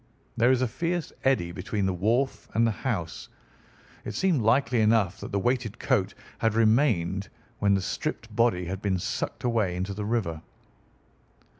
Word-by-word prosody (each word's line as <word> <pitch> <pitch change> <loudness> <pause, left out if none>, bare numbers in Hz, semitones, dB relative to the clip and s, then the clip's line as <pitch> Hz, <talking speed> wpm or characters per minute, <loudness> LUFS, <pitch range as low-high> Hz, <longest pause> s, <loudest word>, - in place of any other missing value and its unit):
There 120 +2 +4
is 130 -1 +3
a - - +2
fierce 170 +5 -2
eddy 130 -11 +2
between 95 +3 -2
the 95 - +1
wharf 115 +9 0
and 115 +1 +4
the 115 - +2
house. 100 -7 -4 0.7
It - - -6
seemed 180 -9 +2
likely 120 +1 +3
enough 105 -3 +2
that - - -7
the 100 - 0
weighted 120 +1 0
coat - - 0 0.2
had 110 -1 +1
remained 110 - +2 0.3
when 100 -1 +3
the 95 - 0
stripped 110 +3 -4
body 115 -6 +2
had 95 +3 -4
been 95 -2 0
sucked 90 - -3
away 110 -7 +1
into 95 +2 -3
the 105 +1 -4
river." 105 -8 -1
110 Hz, 165 wpm, -27 LUFS, 95-120 Hz, 0.7 s, There